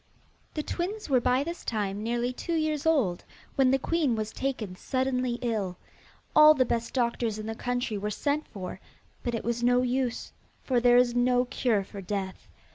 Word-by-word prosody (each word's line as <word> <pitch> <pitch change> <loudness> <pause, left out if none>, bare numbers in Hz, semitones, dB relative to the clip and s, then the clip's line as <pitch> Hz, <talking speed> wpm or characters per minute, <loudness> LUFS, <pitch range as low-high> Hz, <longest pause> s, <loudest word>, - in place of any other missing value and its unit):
The 305 - -1
twins 370 +1 -4
were 255 -2 +4
by 250 +2 +2
this 340 +3 -6
time 205 -3 -2
nearly 240 +2 -1
two 335 +6 -3
years 310 -1 0
old, 240 - +2 0.3
when 265 -2 +4
the 265 - +4
queen 295 -2 +1
was 215 -1 -3
taken 240 -9 -3
suddenly 255 +2 -1
ill. 205 -7 -1 0.6
All 305 0 +9
the 260 -2 +3
best 230 +1 -2
doctors 235 -3 0
in 215 - -6
the 225 - -3
country 245 -2 -2
were 210 +1 -2
sent 290 +8 -1
for, 185 -2 -7 0.4
but 240 -1 -2
it 230 - -3
was 235 0 -1
no 245 +1 +3
use, 250 -1 -1 0.3
for 255 -2 +2
there 245 0 +5
is 245 -1 +4
no 245 +1 +3
cure 240 -5 0
for 200 +1 -9
death. 190 0 -4
245 Hz, 185 wpm, -28 LUFS, 220-265 Hz, 0.6 s, All